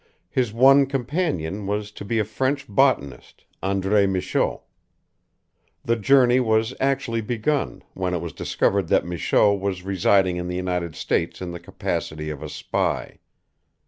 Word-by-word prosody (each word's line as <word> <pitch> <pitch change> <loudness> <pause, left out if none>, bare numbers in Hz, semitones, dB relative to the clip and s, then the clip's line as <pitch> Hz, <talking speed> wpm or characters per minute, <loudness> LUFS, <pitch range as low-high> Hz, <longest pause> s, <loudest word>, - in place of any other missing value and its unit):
His 125 -4 0
one 135 +4 +6
companion 125 - -2
was 105 +1 -2
to 105 - -9
be 115 +3 -2
a 110 - +1
French 135 +6 -1
botanist, 100 - 0 0.2
André 100 +1 +2
Michaux. 95 -1 -1 1.2
The 115 - +2
journey 125 +2 +4
was 110 0 +1
actually 130 -4 0
begun, 120 +6 -2
when 90 -1 -2
it - - -1
was 80 -2 -6
discovered 100 -3 0
that - - +2
Michaux 90 +4 +2
was 95 -2 -3
residing 95 -1 +2
in 90 0 -4
the 90 - -3
United 90 -3 -2
States 85 - -1
in 90 -1 -5
the 85 - -7
capacity 75 -2 -4
of 75 - -8
a - - -6
spy. - - -2
100 Hz, 145 wpm, -23 LUFS, 90-125 Hz, 1.2 s, one